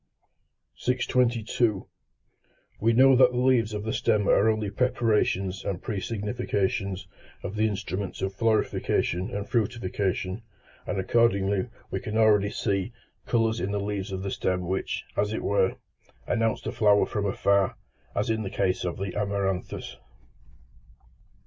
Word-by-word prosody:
622. 120 -4 +1 0.9
We 115 +2 +3
know 130 +3 +6
that 125 0 +5
the - - -2
leaves 125 -3 +3
of 105 -1 -4
the 110 - -2
stem 105 -3 +1
are 110 - +4
only 110 -2 0
preparations 105 -5 +1
and 95 -3 -2
pre 105 0 -3
significations 100 -2 -2 0.4
of 95 - -5
the 110 +1 +2
instruments 95 -1 -4
of 95 0 -2
florification 105 -3 +1
and 100 -1 -4
fructification, 100 -3 -1 0.5
and 100 - -1
accordingly 100 -2 +2 0.2
we - - -1
can 105 +1 -4
already 105 -2 +4
see 100 +1 -1 0.4
colours 115 -1 +1
in 95 - -2
the 100 0 -1
leaves 100 0 -3
of 95 0 -4
the 100 - -3
stem 90 -1 -1
which, 95 +2 -2
as 105 +1 0
it - - -3
were, 100 -2 +2 0.5
announce 115 -1 0
the - - -3
flower 105 -2 +4
from 105 -3 -2
afar, 100 -2 +2 0.4
as 105 +3 0
is 110 0 0
the 100 - -3
case 95 -1 0
in 90 -1 -2
the 95 -2 -4
amaranthus. 100 -2 -2
105 Hz, 145 wpm, -27 LUFS, 95-115 Hz, 0.9 s, know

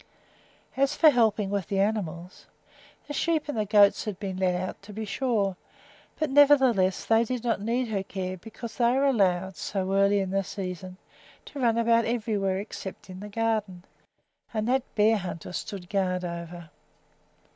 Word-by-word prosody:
As 275 +2 +1
for 315 -2 +7
helping 220 -5 +2
with 200 -4 -2
the 195 - -1
animals, 185 -4 -2 0.6
the 290 - -6
sheep 315 +1 0
and 290 - -3
the 215 -2 -1
goats 205 0 +5
had 210 -4 -4
been 195 -3 -4
let 185 -1 +1
out, 185 +1 -4
to 205 +1 -12
be 220 +2 -4
sure, 205 -4 -1 0.6
but 310 -3 -1
nevertheless 265 -10 +4
they 225 0 +4
did 245 0 -4
not 230 -4 0
need 235 +3 -1
her 200 -3 -1
care 190 -1 -5
because 225 +4 -9
they 240 0 +3
were 270 +2 +2
allowed, 190 - +1
so 190 +1 -2
early 200 +1 +4
in 190 -1 -2
the 195 0 +1
season, 185 -1 -6 0.5
to 285 - -9
run 230 -3 +2
about 230 0 +3
everywhere 210 -5 -1
except 195 -2 -7
in 185 - -9
the 210 +1 -8
garden, 210 -4 -2 0.7
and 215 0 -1
that 260 +2 +2
Bearhunter 210 -6 0
stood 185 -1 -6
guard 185 -2 -1
over. 170 -1 -7
205 Hz, 165 wpm, -27 LUFS, 185-230 Hz, 0.7 s, for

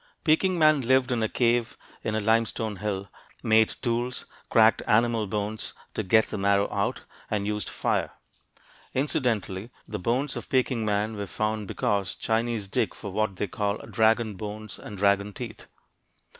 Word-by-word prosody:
Peking 175 +3 +3
man 155 -3 +5
lived 130 +1 +3
in 120 -2 +1
a 110 - +1
cave 120 -1 +1 0.3
in 110 - -1
a - - +2
limestone 110 -1 +1
hill, 100 -1 -3 0.4
made 110 0 +4
tools, 120 +1 -1 0.2
cracked 110 -1 +5
animal 115 -1 +3
bones 105 +2 -3 0.2
to - - -1
get 110 +2 +4
the - - -5
marrow 100 0 +3
out, 100 -1 -1 0.3
and 105 -2 -1
used 105 0 -2
fire. - - 0 0.9
Incidentally, 120 -8 0 0.2
the 105 - -4
bones 125 +8 0
of - - -6
Peking 130 -3 +1
man 105 +1 0
were 100 -1 -4
found 110 +1 -2
because 100 -1 0
Chinese 115 -2 -1
dig - - 0
for - - -7
what 110 -3 0
they 105 - -1
call 100 +1 -1
"dragon 110 -1 +2
bones" 105 +1 -7
and 105 - -8
"dragon 100 +1 +2
teeth." 115 -2 -7
110 Hz, 155 wpm, -27 LUFS, 105-120 Hz, 0.9 s, man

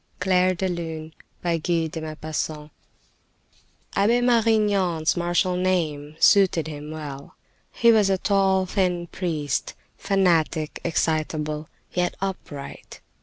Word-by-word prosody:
CLAIR 185 0 +3
DE 190 +2 -1
LUNE 160 -3 -5 0.3
Abbe 165 -1 0 2.3
Marignan's 210 -8 +2
martial 175 +1 +1
name 160 -5 -1
suited 190 -5 +5
him 150 -1 -7
well. 145 -3 -8 0.4
He 235 -1 +4
was 215 -3 +4
a 190 - +2
tall, 190 -1 +2
thin 180 -2 0
priest, 155 -6 -3 0.2
fanatic, 170 -5 +1
excitable, 155 -2 -1 0.2
yet 180 0 0
upright. 180 -7 -6
175 Hz, 90 wpm, -24 LUFS, 155-190 Hz, 2.3 s, suited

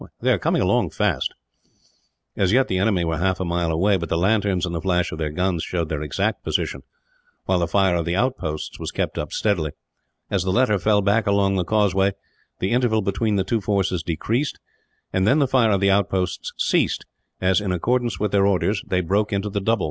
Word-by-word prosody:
They - - +1
are - - +2
coming - - +1
along - - +2
fast." - - 0 1.0
As 95 -1 +1
yet 130 +4 +3
the 95 - -1
enemy 95 -3 +1
were 80 -2 -1
half 95 +1 0
a 95 - -2
mile 85 -1 -1
away, 95 +5 +2
but 85 -3 -5
the 85 - 0
lanterns 95 -1 +1
and 85 - -5
the 85 - -3
flash 90 0 0
of 80 - -6
their 80 -1 -1
guns 90 +2 -1
showed 85 -3 -2
their 80 -2 -3
exact 95 +9 -2
position, - - -2 0.6
while 95 - +1
the 85 - 0
fire 95 0 +2
of 85 -2 -1
the 85 +1 -1
outposts 100 -9 -2
was - - -4
kept - - -3
up - - -4
steadily. 85 -9 0 0.6
As 100 - +1
the 95 - -2
latter 105 0 +2
fell 105 +1 +2
back 105 +2 +2
along 100 -1 +2
the 95 -2 0
causeway, 100 -1 +2 0.4
the 95 - -2
interval 115 -3 +2
between 100 +2 0
the 95 - +1
two 110 +3 -1
forces 95 -3 0
decreased; 110 - -2 0.5
and 95 +1 +2
then 135 - +4
the 140 -3 +3
fire 125 -3 +3
of 100 -2 +1
the 100 0 +4
outposts 95 -2 0
ceased - - +1 0.3
as, 95 +2 +2
in 100 -3 -2
accordance 120 +2 0
with 105 -1 -1
their 100 -1 +3
orders, 100 +1 +1
they 90 -1 +1
broke 100 +5 0
into 100 +1 -2
the 100 0 -2
double. 115 +2 +1
95 Hz, 215 wpm, -22 LUFS, 90-105 Hz, 1.0 s, then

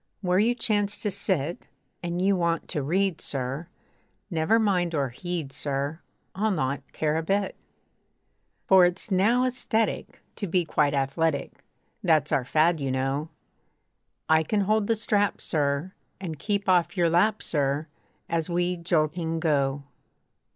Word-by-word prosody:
Where 180 -1 +2
you 235 +4 +3
chance 210 -3 0
to 210 - 0
sit, 180 -5 -1 0.3
And 175 0 -3
you 195 0 +3
want 170 -2 0
to 150 - -1
read, 185 +5 0
sir! 135 +4 -3 0.6
Never 165 +7 +3
mind 180 -6 +1
or 140 -3 0
heed, 165 +1 -5
sir! 140 +2 -2 0.3
I'll 210 +3 0
not 140 -7 -1
care 155 0 0
a - - 0
bit. 195 +4 0 1.1
For 190 -1 +7
it's 180 +4 0
now 225 +7 +3
aesthetic 240 -3 -1
To 200 - -3
be 175 0 +1
quite 145 -2 +1
athletic. 140 +2 -1 0.4
That's 155 -4 +3
our 130 - +2
fad, 160 +4 +3
you 135 -1 -2
know. 135 +4 -1 1.0
I 160 0 +5
can 205 +6 0
hold 215 +1 +1
the 230 - +2
strap, 205 -2 +1
sir! 150 +3 -1 0.3
And 165 -6 -6
keep 205 +1 -1
off 175 0 +2
your 175 -1 +4
lap, 210 +5 +2
sir! 145 0 0 0.4
As 165 0 -1
we 175 +1 0
jolting 165 -1 0
go. 140 -3 +1
170 Hz, 145 wpm, -26 LUFS, 150-195 Hz, 1.1 s, For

